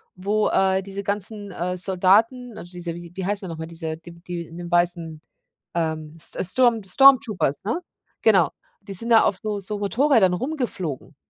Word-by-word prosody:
wo, 205 +3 0
äh, 190 0 +2
diese 200 +1 -6
ganzen, 205 0 -3
äh, 180 +1 -3
Soldaten, 205 +7 +2
also 175 - -10
diese 175 -2 -5
wie 175 -1 -10
wie 190 - -3
heißen 200 0 -1
die - - -7
noch 165 - -6
mal? 160 - -5
Diese 165 -1 -5
die 170 +1 -13
w - - -17
die 175 -1 -4
in 165 - -12
den 175 -1 -7
weißen, 170 -2 +1 0.5
ähm, 160 -2 -2
St - - -4
Sturm 235 +2 +3
Stormtroopers 225 - +4
ne? 230 - -1 0.4
Genau, 195 -7 +4 0.3
die 200 -1 -8
sind 230 +6 -3
da 225 -1 +7
auf 190 - +1
so 210 -2 -2
so 205 +1 -5
Motorrädern 220 -2 +3
rumgeflogen 230 - -4
190 Hz, 185 wpm, -23 LUFS, 175-215 Hz, 0.5 s, da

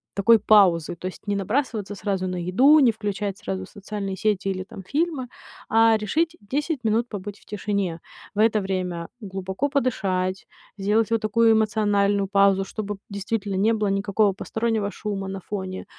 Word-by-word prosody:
такой 225 +3 +6
паузы. 190 -6 +4
То 180 - -6
есть 185 - -10
не 205 - 0
набрасываться 210 0 -2
сразу 195 -2 -2
на 180 - -3
еду, 205 - +5
не 260 -5 +5
включать 205 -2 -3
сразу 95 -1 -4
социальные 200 - -6
сети 205 -1 0
или 185 -1 -2
там 190 0 -11
фильмы, 290 - -1 0.4
а, 225 0 +5
решить 320 +11 0
10 290 +8 -2
минут 225 +2 +1
побыть 205 -2 -7
в - - -24
тишине. 200 -4 -2 0.3
В - - -3
это 220 0 +4
время 180 -3 -3
глубоко 190 +6 -3
подышать, 195 -9 -1 0.3
сделать 210 +3 +1
вот 230 -1 +2
такую 225 +1 +4
эмоциональную 205 -2 +2
паузу, 195 -1 +3
чтобы, 205 0 -5
п 195 - -22
действительно 200 0 -3
не 205 +4 +3
было 215 -2 0
никакого 200 +1 +2
постороннего 220 0 -2
шума 195 -3 -4
на 195 0 -5
фоне. 190 -1 -5
205 Hz, 165 wpm, -24 LUFS, 190-220 Hz, 0.4 s, такой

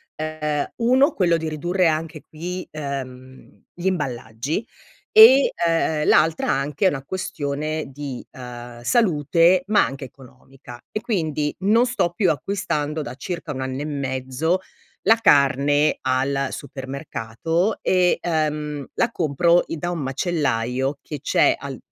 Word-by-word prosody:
Uhm, 155 -1 -3
1 260 +6 +4
quello 175 -3 +2
di 160 -1 -2
ridurre 175 +4 0
anche 155 0 -3
qui, 180 +4 -6
uhm, 130 -3 -8
gli 175 - -9
imballaggi, 130 - -2 0.5
e, 350 -12 +8 0.2
uhm, 160 -2 +1
l'altra 160 +1 +3
anche 140 +6 -1
è - - +7
una 135 -5 -5
questione 155 -3 -3
di, 135 -1 -7
uhm, 120 -1 -9
salute 170 - +3
ma 210 0 +4
anche 135 0 -6
economica 130 -1 -14
e 215 - -3
quindi 155 - -1
non 215 +6 +3
sto 235 -8 0
più 190 -1 +2
acquistando, 155 -3 -2
da 125 -3 -6
circa 170 +1 -5
un 130 -2 -5
anno 130 +1 -3
e - - -3
mezzo, 140 +3 -1 0.4
la 225 - +6
carne 145 - +3
al 135 +1 0
supermercato 140 - -3
e, 180 -1 +2
uhm, 150 -3 -2
la 235 - +1
compro 170 0 +2
da 165 +1 -4
i - - -1
un 175 - -3
macellaio 135 -2 -1
che 150 - -7
c'è - - +3
al - - -7
150 Hz, 135 wpm, -22 LUFS, 135-175 Hz, 0.5 s, e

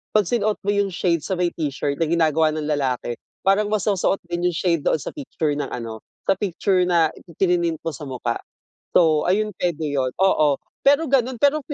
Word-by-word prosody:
pag 215 - +5
sinuot 215 +1 0
mo 205 - +2
yung 200 -1 +2
shade 170 -2 0
sa 190 - -2
may 175 -1 +1
t-shirt 145 -2 -2
na 165 - +2
ginagawa 160 -1 +3
ng 155 - -3
lalaki, 130 -4 -1 0.3
parang 195 +2 +3
masosoot 200 -2 +1
din 175 +1 0
yung 175 - -5
shade 170 -2 +1
doon - - +2
sa 150 - -6
picture 185 - -2
ng 145 - -2
ano, 115 -2 -6 0.3
sa - - +4
picture 190 -1 +1
na 165 -3 +3 0.3
prinint 175 -3 +1
mo 165 - 0
sa 145 +1 -8
mukha. 125 -2 -3 0.5
So, 155 -3 +4
ayun 210 +2 +1
pwede 165 -3 -1
yun, 135 -3 0
oo. 155 -7 +3 0.3
pero 285 +3 +6
ganun 260 -2 +2
pero 285 +3 +4
170 Hz, 190 wpm, -22 LUFS, 150-200 Hz, 0.5 s, pero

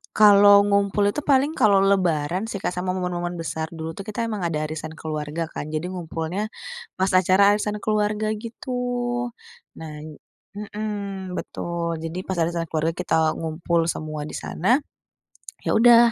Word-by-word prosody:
Kalau 205 -1 +8
ngumpul 200 0 +2
itu 295 - -3
paling 280 +1 +3
kalau 200 -2 +5
Lebaran 185 -1 +1
sih, 205 -3 -4
Kak, - - 0
sama 180 +1 -1
momen-momen 175 -1 -2
besar. 160 -1 -3
Dulu 160 0 -5
tuh 195 - -6
kita 215 +2 -2
emang 220 -3 -3
ada 155 -2 -1
arisan 155 +1 -5
keluarga 155 0 -4
kan, 150 - -5
jadi 155 +3 -3
ngumpulnya 175 +3 -3 0.5
pas 190 0 +1
acara 190 +2 +5
arisan 210 0 -1
keluarga 215 0 0 0.2
gitu. 230 +3 -9 1.1
Nah 160 -1 -7 0.7
mhm, 205 -3 -5
betul 170 -1 -3
jadi 165 +2 -5
pas 190 - -1
arisan 170 0 0
keluarga 160 +1 0
kita 160 -3 +2
ngumpul 165 +1 0
semua 155 -2 -4
di - - -7
sana. 235 - +1 0.9
Ya - - +1
udah, 235 0 +7
185 Hz, 150 wpm, -23 LUFS, 165-205 Hz, 1.1 s, Kalau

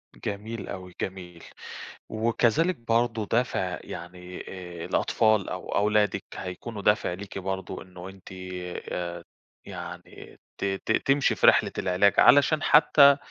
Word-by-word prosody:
جميل 105 +2 -5
أوي، 90 -2 -8
جميل، 90 -3 -6 0.7
وكذلك 115 +10 +1
برضه 115 -2 0
دافع 110 -6 0
يعني 90 +1 -8
آآ 90 -3 -8
الأطفال 110 -3 +2
أو - - -5
أولادِك، 105 -1 +2
هيكونوا 100 +3 -6
دافع 105 -3 +2
ليكِ 95 +2 -8
برضه، 95 0 -4
إنه 90 0 -10
أنتِ 95 0 -14 0.6
آآ 85 -1 -4 0.4
يعني 90 -2 -10 0.2
ت - - -3
ت 95 +2 -2
تمشي 135 +4 +2
في - - +3
رحلة - - +5
العلاج، 95 +2 +3
علشان 145 +2 +5
حتى 140 -2 +6
100 Hz, 120 wpm, -26 LUFS, 90-115 Hz, 0.7 s, حتى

